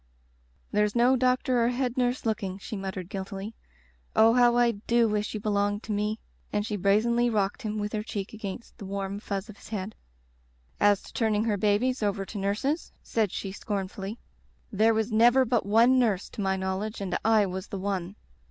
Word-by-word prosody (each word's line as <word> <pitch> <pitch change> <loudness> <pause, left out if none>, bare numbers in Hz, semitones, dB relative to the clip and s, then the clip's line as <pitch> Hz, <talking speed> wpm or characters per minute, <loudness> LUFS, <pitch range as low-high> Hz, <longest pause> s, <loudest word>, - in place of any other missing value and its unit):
"There's 210 +1 +1
no 245 +2 +5
doctor 255 -1 +2
or 235 - +3
head 250 0 -1
nurse 250 -1 0
look 220 -1 +1
ing/' 190 -1 -5
she 215 - -6
muttered 190 -2 -5
guiltily. 195 +2 -6 0.6
"Oh, 225 +1 +6
how 240 -1 +5
Ido 235 0 +2
wish 210 0 -1
you - - -2
belonged 205 0 0
to - - -5
me," 210 +1 0 0.3
and 205 0 0
she 215 - -2
brazenly 220 +5 +2
rocked 205 +1 0
him 215 -2 -3
with 210 0 -3
her 215 - -1
cheek 205 -2 -5
against 215 +2 -7
the 200 - -7
warm 195 0 -3
fuzz 200 -1 -4
of 215 -2 -11
his - - -14
head. 210 -1 -4 0.9
"As 205 -1 +4
to - - -13
turning 215 -2 +1
her 220 -2 +1
babies 215 +6 +1
over 200 -2 0
to 205 - -6
nurses," 215 - -1
said 215 -5 0
she 195 - -4
scornfully, 195 +1 -4 0.3
*' - - -37
there 220 +2 +3
was 220 +1 0
never 240 +4 +5
but 235 -4 0
one 235 +5 +5
nurse, 210 -6 +1
to - - -6
my 190 -1 +1
knowledge, 190 +3 -3
and 195 -2 -2
I 220 -2 +4
was 185 0 -5
the 200 - -5
one. 190 -1 -3
210 Hz, 195 wpm, -27 LUFS, 200-230 Hz, 0.9 s, Oh